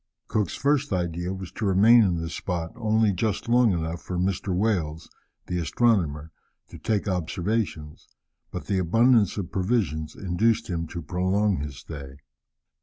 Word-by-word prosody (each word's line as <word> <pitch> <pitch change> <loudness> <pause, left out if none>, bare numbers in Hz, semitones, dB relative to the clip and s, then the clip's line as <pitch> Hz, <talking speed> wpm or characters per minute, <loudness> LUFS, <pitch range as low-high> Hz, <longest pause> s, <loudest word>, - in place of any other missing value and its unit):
Cook's 105 -5 -1
first 145 -1 +1
idea 85 -1 -2
was 95 -2 -6
to 110 - -4
remain 105 +5 +6
in 90 -5 +2
this 80 0 -5
spot 85 -3 -3
only 110 -2 +2
just 100 +4 -2
long 120 -1 +4
enough 85 -1 -2
for 90 - -5
Mr. 95 +1 -1
Wales, 90 -5 -1 0.4
the 90 - -2
astronomer, 80 - +1 0.4
to - - -11
take 105 -2 -1
observations, 90 -3 -2 0.4
but - - -6
the 95 -2 0
abundance 115 +4 +3
of 95 -4 -4
provisions 90 -6 -1
induced 100 +3 0
him 85 -1 -2
to 85 +1 -6
prolong 95 +5 +1
his 70 -2 -5
stay. 70 -2 -9
95 Hz, 150 wpm, -25 LUFS, 85-110 Hz, 0.4 s, remain